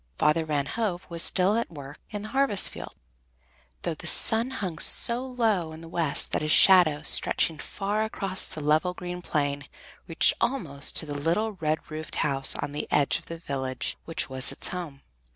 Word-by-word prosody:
Father 155 Hz, +2 st, +2 dB
Van 145 Hz, -2 st, -1 dB
Hove 190 Hz, +1 st, -3 dB
was 170 Hz, -1 st, -3 dB
still 190 Hz, +4 st, +2 dB
at 235 Hz, -, -2 dB
work 145 Hz, -3 st, -11 dB
in 205 Hz, -1 st, -6 dB
the 215 Hz, -, -7 dB
harvest 270 Hz, -8 st, +3 dB
field, -, -, -10 dB, 0.9 s
though -, -, -2 dB
the -, -, -8 dB
sun 225 Hz, +3 st, +5 dB
hung 190 Hz, -11 st, -5 dB
so 235 Hz, +2 st, +5 dB
low 220 Hz, -10 st, -1 dB
in 160 Hz, -, -11 dB
the 165 Hz, -, -11 dB
west 165 Hz, -3 st, -1 dB
that -, -, -1 dB
his 155 Hz, 0 st, -1 dB
shadow, 165 Hz, -6 st, +5 dB
stretching 155 Hz, +1 st, +2 dB
far 205 Hz, +2 st, -3 dB
across 195 Hz, -3 st, -3 dB
the 155 Hz, -, -7 dB
level, 155 Hz, +5 st, +1 dB
green 180 Hz, 0 st, -7 dB
plain, 145 Hz, -4 st, -2 dB, 0.4 s
reached 165 Hz, -, +4 dB
almost 155 Hz, -, -1 dB
to -, -, +1 dB
the 145 Hz, -, -6 dB
little 170 Hz, +10 st, -1 dB
red 160 Hz, -5 st, -3 dB
roofed 155 Hz, 0 st, -7 dB
house 135 Hz, -2 st, +2 dB
on 145 Hz, 0 st, -4 dB
the 145 Hz, -, -5 dB
edge 145 Hz, +2 st, +1 dB
of 170 Hz, -, -21 dB
the 165 Hz, -, -7 dB
village 130 Hz, -5 st, -4 dB
which 165 Hz, -, -1 dB
was 130 Hz, -1 st, -1 dB
its -, -, +1 dB
home. 170 Hz, -7 st, -7 dB
165 Hz, 190 wpm, -26 LUFS, 150-195 Hz, 0.9 s, sun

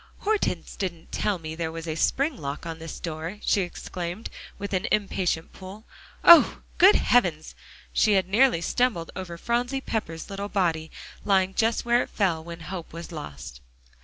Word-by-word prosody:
"Hortense 425 Hz, 0 st, -1 dB
didn't 170 Hz, -4 st, -5 dB
tell 205 Hz, -2 st, 0 dB
me 160 Hz, -2 st, -7 dB
there 160 Hz, 0 st, -3 dB
was 165 Hz, 0 st, -7 dB
a 160 Hz, -, -1 dB
spring 275 Hz, -, +1 dB
lock 145 Hz, -5 st, -5 dB
on 165 Hz, -1 st, -5 dB
this 165 Hz, -1 st, -7 dB
door," 165 Hz, +3 st, -5 dB
she 200 Hz, -, +3 dB
exclaimed, 180 Hz, +2 st, -5 dB, 0.3 s
with 200 Hz, 0 st, -5 dB
an 185 Hz, -, 0 dB
impatient 190 Hz, -5 st, 0 dB
pull. 195 Hz, +4 st, -11 dB, 0.4 s
"Oh! 340 Hz, -3 st, +8 dB, 0.2 s
good 385 Hz, +4 st, +8 dB
heavens." 175 Hz, -10 st, +2 dB, 0.4 s
She 215 Hz, -, +4 dB
had 190 Hz, -2 st, +2 dB
nearly 220 Hz, -2 st, +4 dB
stumbled 210 Hz, -4 st, 0 dB
over 175 Hz, -3 st, -6 dB
Phronsie 245 Hz, +7 st, -1 dB
Pepper's 210 Hz, -10 st, -4 dB
little 200 Hz, +1 st, -5 dB
body, 165 Hz, -5 st, 0 dB, 0.3 s
lying 190 Hz, -2 st, +2 dB
just 225 Hz, +3 st, +1 dB
where 240 Hz, +1 st, +4 dB
it -, -, -5 dB
fell 175 Hz, -6 st, 0 dB
when 170 Hz, 0 st, -9 dB
hope 170 Hz, 0 st, -7 dB
was 170 Hz, +1 st, -8 dB
lost. 70 Hz, -, -8 dB
185 Hz, 165 wpm, -26 LUFS, 165-215 Hz, 0.4 s, Oh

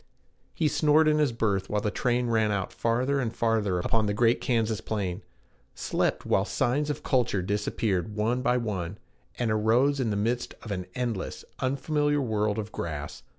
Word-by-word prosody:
He 155 Hz, -, +2 dB
snored 155 Hz, +1 st, +4 dB
in 155 Hz, 0 st, +3 dB
his 150 Hz, -4 st, +3 dB
berth 105 Hz, -4 st, 0 dB
while 105 Hz, -, +1 dB
the 105 Hz, 0 st, -1 dB
train 125 Hz, +1 st, +1 dB
ran 110 Hz, -2 st, +2 dB
out 100 Hz, -2 st, -2 dB
farther 125 Hz, +5 st, +1 dB
and 120 Hz, -4 st, -1 dB
farther 110 Hz, -5 st, +1 dB
upon 110 Hz, +4 st, +1 dB
the 100 Hz, -, 0 dB
great 115 Hz, +2 st, +3 dB
Kansas 115 Hz, -3 st, 0 dB
plain; 100 Hz, -3 st, -3 dB, 0.5 s
slept -, -, -1 dB
while -, -, +2 dB
signs 145 Hz, +5 st, 0 dB
of 150 Hz, -, -3 dB
culture 120 Hz, -8 st, +1 dB
disappeared 105 Hz, 0 st, -1 dB
one 115 Hz, +4 st, 0 dB
by 125 Hz, 0 st, +2 dB
one, 100 Hz, -6 st, -3 dB, 0.4 s
and 120 Hz, -3 st, 0 dB
arose 120 Hz, +7 st, +3 dB
in 125 Hz, -4 st, +1 dB
the 105 Hz, -, 0 dB
midst 120 Hz, +4 st, -1 dB
of 110 Hz, -, -7 dB
an 90 Hz, -2 st, -3 dB
endless, 120 Hz, -6 st, -3 dB
unfamiliar 145 Hz, +2 st, +1 dB
world 105 Hz, -4 st, 0 dB
of 110 Hz, -1 st, -4 dB
grass. 75 Hz, -3 st, -5 dB
115 Hz, 175 wpm, -27 LUFS, 105-125 Hz, 0.5 s, snored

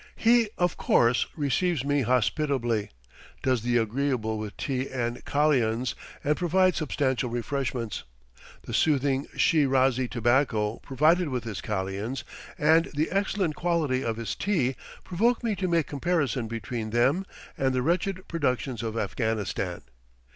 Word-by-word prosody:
He, 230 Hz, -1 st, +4 dB
of 175 Hz, -2 st, +1 dB
course, 120 Hz, 0 st, +3 dB
receives 150 Hz, 0 st, 0 dB
me 145 Hz, 0 st, +2 dB
hospitably, 125 Hz, -2 st, +1 dB, 0.5 s
does 130 Hz, -3 st, +2 dB
the 120 Hz, +1 st, +1 dB
agreeable 115 Hz, -1 st, 0 dB
with 105 Hz, -1 st, -6 dB
tea 130 Hz, -2 st, -2 dB
and 120 Hz, -2 st, -3 dB
kalians, 130 Hz, -5 st, +1 dB, 0.3 s
and 150 Hz, +1 st, +2 dB
provides 185 Hz, +2 st, +2 dB
substantial 130 Hz, -5 st, 0 dB
refreshments. 120 Hz, -1 st, -3 dB, 0.6 s
The -, -, -7 dB
soothing 140 Hz, -2 st, +2 dB
Shi 155 Hz, -3 st, +4 dB
razi 130 Hz, -2 st, +2 dB
tobacco 115 Hz, -2 st, +1 dB
provided 155 Hz, +5 st, +2 dB
with 125 Hz, -3 st, -2 dB
his 110 Hz, -4 st, -5 dB
kalians, 105 Hz, +5 st, -3 dB, 0.3 s
and 160 Hz, +2 st, +4 dB
the 155 Hz, +2 st, 0 dB
excellent 195 Hz, -3 st, 0 dB
quality 160 Hz, -7 st, 0 dB
of 115 Hz, -3 st, -2 dB
his 115 Hz, -1 st, -3 dB
tea, 150 Hz, -11 st, 0 dB, 0.3 s
provoke 230 Hz, +8 st, +1 dB
me 225 Hz, -3 st, 0 dB
to 185 Hz, -, -1 dB
make 170 Hz, -3 st, +2 dB
comparison 140 Hz, -5 st, -1 dB
between 115 Hz, 0 st, -4 dB
them 130 Hz, -, +2 dB, 0.3 s
and 135 Hz, -1 st, +1 dB
the 125 Hz, -, +1 dB
wretched 185 Hz, +4 st, -1 dB
productions 130 Hz, -6 st, -1 dB
of 115 Hz, -1 st, -3 dB
Afghanistan. 110 Hz, +1 st, -2 dB
130 Hz, 135 wpm, -27 LUFS, 120-160 Hz, 0.6 s, He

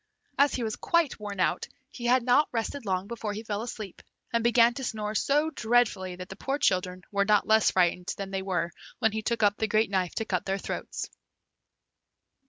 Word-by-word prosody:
As 280 Hz, +1 st, +3 dB
he 245 Hz, -, -2 dB
was 220 Hz, -1 st, -3 dB
quite 335 Hz, -8 st, +1 dB
worn 205 Hz, -2 st, -6 dB
out, -, -, +1 dB, 0.2 s
he 240 Hz, -, -7 dB
had 250 Hz, 0 st, +4 dB
not 255 Hz, +5 st, +4 dB
rested 230 Hz, +1 st, -3 dB
long 185 Hz, 0 st, 0 dB
before 220 Hz, -1 st, -4 dB
he 215 Hz, +2 st, -6 dB
fell 210 Hz, -2 st, -3 dB
asleep, 220 Hz, -5 st, -7 dB, 0.3 s
and 230 Hz, -1 st, +2 dB
began 235 Hz, 0 st, +5 dB
to 265 Hz, -, -6 dB
snore 215 Hz, -3 st, -3 dB
so 295 Hz, +7 st, +2 dB
dreadfully 220 Hz, -, +1 dB
that 180 Hz, 0 st, -8 dB
the 195 Hz, -, -7 dB
poor 270 Hz, +7 st, -2 dB
children 185 Hz, -6 st, 0 dB
were 200 Hz, -1 st, +2 dB
not 210 Hz, 0 st, +3 dB
less 220 Hz, 0 st, +5 dB
frightened 180 Hz, 0 st, +1 dB
than 195 Hz, -1 st, -5 dB
they 195 Hz, 0 st, -2 dB
were 175 Hz, -3 st, -1 dB, 0.3 s
when 225 Hz, -, +2 dB
he 220 Hz, +1 st, -2 dB
took 230 Hz, 0 st, -1 dB
up 205 Hz, 0 st, +4 dB
the 220 Hz, -, 0 dB
great 215 Hz, 0 st, +2 dB
knife 185 Hz, -3 st, 0 dB
to 225 Hz, -, -1 dB
cut 180 Hz, -3 st, -2 dB
their 195 Hz, 0 st, 0 dB
throats. -, -, -5 dB
215 Hz, 205 wpm, -28 LUFS, 195-235 Hz, 0.3 s, began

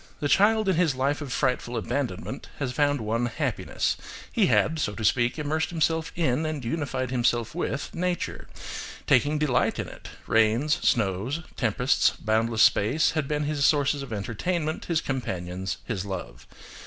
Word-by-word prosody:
The 145 Hz, -, 0 dB
child 215 Hz, +6 st, +4 dB
in 190 Hz, -4 st, +2 dB
his 165 Hz, -6 st, +2 dB
life 140 Hz, +3 st, 0 dB
of 140 Hz, -4 st, -5 dB
frightful 125 Hz, -2 st, 0 dB
abandonment 120 Hz, -3 st, -3 dB
had 130 Hz, -3 st, -2 dB
found 145 Hz, -2 st, +2 dB
one 115 Hz, +3 st, 0 dB
happiness; 125 Hz, -2 st, -1 dB, 0.3 s
he -, -, +3 dB
had, 160 Hz, 0 st, +2 dB
so 105 Hz, -8 st, -1 dB
to 110 Hz, -, -3 dB
speak, 120 Hz, +4 st, +2 dB
immersed 155 Hz, +1 st, -1 dB
himself 160 Hz, -1 st, 0 dB
in, 155 Hz, -3 st, +1 dB
and 155 Hz, -5 st, -3 dB
unified 130 Hz, -1 st, -2 dB
himself 120 Hz, -2 st, +1 dB
with, 150 Hz, -4 st, -3 dB
nature, 180 Hz, 0 st, -2 dB, 0.6 s
taking 150 Hz, +1 st, +3 dB
delight 150 Hz, -5 st, +1 dB
in -, -, -3 dB
it–rains, 115 Hz, +7 st, 0 dB
snow, 100 Hz, 0 st, +1 dB, 0.3 s
tempests, 125 Hz, +2 st, +2 dB
boundless 110 Hz, +1 st, +2 dB
space, 130 Hz, +10 st, +4 dB
had 155 Hz, -4 st, -1 dB
been 150 Hz, 0 st, -1 dB
his 145 Hz, -1 st, -1 dB
sources 145 Hz, 0 st, +3 dB
of 135 Hz, -3 st, -7 dB
entertainment, 150 Hz, -, -2 dB
his 165 Hz, -3 st, +1 dB
companions, 95 Hz, -8 st, -3 dB
his 105 Hz, -7 st, -3 dB
love. 95 Hz, -11 st, -7 dB
135 Hz, 155 wpm, -26 LUFS, 115-155 Hz, 0.6 s, child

